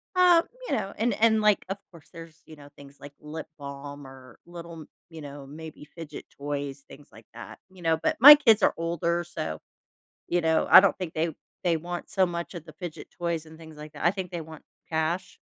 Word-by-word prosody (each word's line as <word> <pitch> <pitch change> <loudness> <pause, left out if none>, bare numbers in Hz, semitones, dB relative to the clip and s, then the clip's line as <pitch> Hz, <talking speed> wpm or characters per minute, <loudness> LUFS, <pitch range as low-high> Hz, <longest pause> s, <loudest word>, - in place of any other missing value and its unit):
uh, 360 -2 +6 0.3
you - - +1
know, 195 - -3
and 235 +3 +1
and 220 -1 +4
like, 210 -1 +3
of 195 - -3
course, 170 -4 -17
there's, 165 -1 -12
you 155 - -13
know, 145 -1 -15
things 140 0 -15
like 145 0 -11
lip 155 +1 -8
balm 140 0 -8
or 130 -1 -15
little 170 -1 -10
m - - -13 0.2
you 160 -2 -10
know, 145 -1 -9
maybe 155 +1 -10
fidget 165 -3 -9
toys, 140 -1 -4
things 145 +1 -15
like 110 0 -16
that. 120 - -10
You 185 -1 -16
know, 165 -1 +2
but - - 0
my 290 +5 +12
kids 225 -8 +4
are - - +4
older, 170 +1 -1
so, 80 - -5 0.7
you 175 0 +1
know, 160 -1 +1
I - - +11
don't 195 0 +2
think 180 -4 -5
they 160 +1 -1 0.3
they 170 -2 +2
want 175 +2 -6
so 190 - +2
much 170 0 -5
of 165 -2 -8
the 155 - -13
fidget 175 -3 -8
toys 170 -2 -2
and 160 0 -14
things 160 -1 -13
like 150 0 -10
that. 150 - -6
I 175 - +5
think 190 -2 -6
they 170 - -4
want 160 -1 -12 0.3
cash. 165 +3 -2
165 Hz, 220 wpm, -26 LUFS, 145-175 Hz, 0.7 s, my